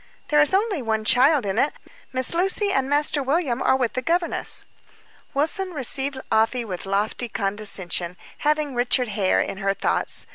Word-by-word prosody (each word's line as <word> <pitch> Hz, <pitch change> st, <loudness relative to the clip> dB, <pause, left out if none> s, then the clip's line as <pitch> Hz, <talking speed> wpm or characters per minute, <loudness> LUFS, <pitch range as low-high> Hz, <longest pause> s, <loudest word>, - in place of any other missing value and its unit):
"There 295 Hz, 0 st, +4 dB
is 295 Hz, -, +4 dB
only 390 Hz, -4 st, 0 dB
one 220 Hz, -2 st, -2 dB
child 265 Hz, +2 st, +4 dB
in 195 Hz, -1 st, -1 dB
it. 290 Hz, -, +1 dB, 0.4 s
Miss 260 Hz, +2 st, +2 dB
Lucy 385 Hz, +4 st, +2 dB
and 270 Hz, -6 st, 0 dB
Master 290 Hz, 0 st, +3 dB
William 270 Hz, -2 st, -1 dB
are -, -, +3 dB
with 255 Hz, -3 st, -1 dB
the 255 Hz, -, -2 dB
governess." 335 Hz, +5 st, -1 dB, 0.7 s
Wilson 360 Hz, +6 st, -1 dB
received 270 Hz, 0 st, +1 dB
Afy 225 Hz, +2 st, +1 dB
with 185 Hz, -2 st, -6 dB
lofty 205 Hz, +5 st, -1 dB
condescension, 195 Hz, -4 st, -1 dB, 0.2 s
having 300 Hz, -1 st, 0 dB
Richard 245 Hz, 0 st, +1 dB
Hare 200 Hz, -2 st, +1 dB
in 195 Hz, -, -4 dB
her 195 Hz, 0 st, 0 dB
thoughts. -, -, 0 dB
260 Hz, 160 wpm, -23 LUFS, 215-300 Hz, 0.7 s, There